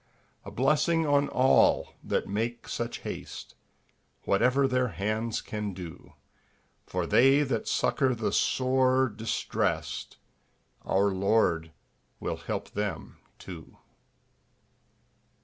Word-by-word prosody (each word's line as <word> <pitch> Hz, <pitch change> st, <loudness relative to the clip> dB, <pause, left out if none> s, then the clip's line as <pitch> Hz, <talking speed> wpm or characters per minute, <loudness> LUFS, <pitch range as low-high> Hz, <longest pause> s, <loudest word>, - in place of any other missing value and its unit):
A -, -, -8 dB
blessing 150 Hz, +5 st, +2 dB
on 145 Hz, -1 st, +3 dB
all 130 Hz, +1 st, +3 dB
that -, -, -1 dB
make 115 Hz, +4 st, -3 dB
such 115 Hz, 0 st, -4 dB
haste, -, -, -7 dB, 0.7 s
Whatever 130 Hz, +7 st, +3 dB
their 125 Hz, -1 st, +1 dB
hands 110 Hz, +2 st, -2 dB
can 105 Hz, -3 st, -5 dB
do! 90 Hz, -3 st, -10 dB, 0.7 s
For -, -, -2 dB
they 135 Hz, +3 st, +5 dB
that 130 Hz, -6 st, -2 dB
succour 130 Hz, -3 st, +1 dB
the 110 Hz, -1 st, -1 dB
sore 130 Hz, 0 st, +2 dB
distressed, 110 Hz, +2 st, -2 dB, 0.7 s
Our 100 Hz, +1 st, +2 dB
Lord 95 Hz, -4 st, +1 dB, 0.5 s
will -, -, -3 dB
help -, -, -5 dB
them 105 Hz, 0 st, -4 dB, 0.2 s
too. 85 Hz, -4 st, -11 dB
115 Hz, 100 wpm, -28 LUFS, 100-130 Hz, 0.7 s, they